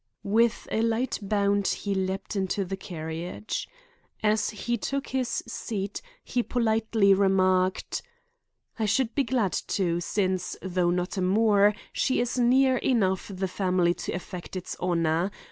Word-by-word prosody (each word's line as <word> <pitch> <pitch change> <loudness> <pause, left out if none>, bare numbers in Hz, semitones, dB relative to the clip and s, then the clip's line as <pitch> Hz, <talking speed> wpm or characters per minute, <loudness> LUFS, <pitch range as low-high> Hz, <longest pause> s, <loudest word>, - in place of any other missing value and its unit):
With 230 +3 +2
a 220 - +1
light 230 +3 0
bound 200 0 +1
he 200 - -1
leaped 190 +2 -2
into 195 0 0
the 195 +2 -3
carriage. 170 +2 -5 0.5
As 215 0 +2
he 235 +3 -2
took 275 +5 -3
his 260 -2 -1
seat 210 -3 -4 0.2
he 245 - 0
politely 220 -4 +2
remarked: 185 -1 +2 0.8
"I 220 - +1
should 225 +2 +1
be 280 - +2
glad 230 -6 0
to, 175 -3 0
since, 185 -1 -1
though 180 -2 +1
not 180 +3 -1
a - - 0
Moore, 205 +2 +4 0.2
she 260 - +1
is 245 +1 -1
near 260 +2 +4
enough 195 -8 +1
the 190 0 -2
family 180 -2 +1
to - - -5
affect 180 0 -7
its 185 - -5
honor. 170 0 +1
200 Hz, 145 wpm, -27 LUFS, 185-225 Hz, 0.8 s, Moore